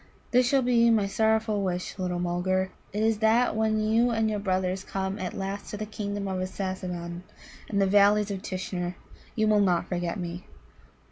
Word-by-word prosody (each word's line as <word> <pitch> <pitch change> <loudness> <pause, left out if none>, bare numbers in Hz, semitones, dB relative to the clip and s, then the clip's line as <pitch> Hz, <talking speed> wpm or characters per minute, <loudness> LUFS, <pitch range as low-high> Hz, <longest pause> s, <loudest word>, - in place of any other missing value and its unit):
"This 250 0 +4
shall 270 -1 +3
be 235 -1 +4
my 220 -3 +3
sorrowful 220 +1 +1
wish, 180 0 -3
little 180 -1 -1
Mulgar: 180 +2 0 0.2
it 210 +2 -1
is 220 -1 +2
that 225 +2 +3
when 220 0 +1
you 225 +3 +3
and 220 -2 +1
your 210 - -1
brothers 185 -1 -1
come 195 +1 -3
at 185 - -4
last 195 +1 -4
to 210 - -5
the 215 - -4
Kingdom 205 -1 -4
of 190 -1 -2
Assasimmon, 185 -2 -4 0.5
and 200 - 0
the 195 - +4
Valleys 205 +1 +4
of 195 -1 -4
Tishnar, 180 -2 -4 0.4
you 215 -1 +2
will 210 -1 +4
not 180 -4 +2
forget 175 -1 -2
me." 175 +1 -5
200 Hz, 185 wpm, -27 LUFS, 185-215 Hz, 0.5 s, This